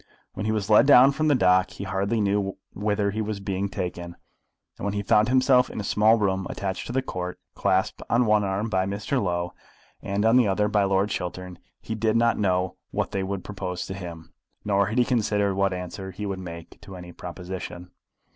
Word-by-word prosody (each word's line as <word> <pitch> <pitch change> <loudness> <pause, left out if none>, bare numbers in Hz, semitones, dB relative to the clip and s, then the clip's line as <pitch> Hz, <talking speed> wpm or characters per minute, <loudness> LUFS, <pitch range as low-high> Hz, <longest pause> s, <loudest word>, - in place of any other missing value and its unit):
When 105 - -4
he - - +1
was 105 -2 -1
led 110 +5 +6
down 135 -1 +8
from 155 +3 -1
the 145 - +4
dock 95 -4 +4
he - - -8
hardly 100 +4 -1
knew 100 -1 0 0.2
whither 105 0 0
he 110 +2 -2
was 105 -1 -3
being 100 0 -2
taken, 90 -3 -5 0.6
and - - -8
when 100 0 -1
he 100 - -2
found 105 +3 +3
himself 130 0 +4
in - - -6
a - - -3
small 105 +3 +4
room 95 -3 0
attached 95 -1 -4
to - - -5
the 130 +1 0
Court, 90 -6 -5 0.2
clasped 95 0 0
on 120 +1 +3
one 105 -1 +3
arm 100 +2 -1
by 95 -3 0
Mr. 105 +7 -1
Low 90 -2 -2 0.5
and 100 +2 -1
on 115 +2 +5
the 125 -4 +4
other 105 +2 +1
by 105 -1 +2
Lord 95 +2 +1
Chiltern, 90 0 -5 0.2
he - - -5
did 110 0 0
not 115 0 +3
know 95 -2 0
what - - -2
they 95 - -1
would 95 0 -3
propose 90 -3 -5
to 95 - -6
him, 85 -4 -9 0.3
nor 100 -1 +2
had 110 +4 -3
he 125 - +4
considered 105 -5 +1
what 100 0 +1
answer 90 +1 -6
he 100 +3 -6
would 95 -2 -3
make 85 -2 -9
to 95 - -10
any 90 -1 -9
proposition. 90 0 -7
100 Hz, 215 wpm, -25 LUFS, 95-110 Hz, 0.6 s, down